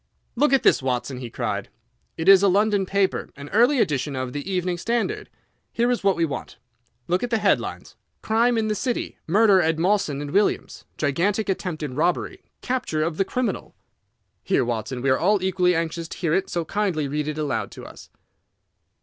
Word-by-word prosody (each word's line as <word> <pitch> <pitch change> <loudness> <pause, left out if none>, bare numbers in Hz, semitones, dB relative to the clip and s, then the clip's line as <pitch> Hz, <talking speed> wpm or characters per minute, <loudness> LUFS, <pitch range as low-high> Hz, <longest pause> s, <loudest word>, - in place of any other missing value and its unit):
"Look 295 0 +3
at 270 -2 +3
this, - - +4
Watson," 125 0 -2
he 125 -2 -6
cried. - - -3 0.5
"It 160 - -3
is 195 -1 +8
a 200 - +4
London 200 0 +2
paper, 195 0 0
an 140 +1 -9
early 240 +7 +4
edition 145 - 0
of 130 -1 -4
the 145 +7 -5
Evening 180 -1 -1
Standard. 240 - -2 0.4
Here 240 +1 +1
is 245 - -1
what 195 -2 +3
we 170 - +1
want. 145 - -6 0.5
Look 180 +2 +1
at 245 - -2
the 230 - +1
headlines: - - -1 0.3
'Crime 230 +2 +2
in 220 -1 0
the 215 - +1
City. 245 +3 -3
Murder 200 +1 +5
at 160 -1 +1
Mawson 165 -5 0
& - - -9
Williams'. 205 +1 0
Gigantic 195 +9 0
Attempted 160 -6 -3
Robbery. 165 +6 -1 0.2
Capture 245 -12 -1
of 160 0 -2
the 195 - +2
Criminal.' 240 -1 -3 0.7
Here, - - +1
Watson, 120 +2 -3
we 135 - +3
are 130 - +2
all 200 +5 +3
equally 180 -1 +2
anxious 165 0 -2
to - - -9
hear 165 -4 0
it, 195 +1 0
so 170 -1 -2
kindly 185 -7 -1
read 150 +2 -2
it 155 0 -3
aloud 130 -9 -2
to - - -11
us." - - -13
180 Hz, 190 wpm, -23 LUFS, 150-210 Hz, 0.7 s, is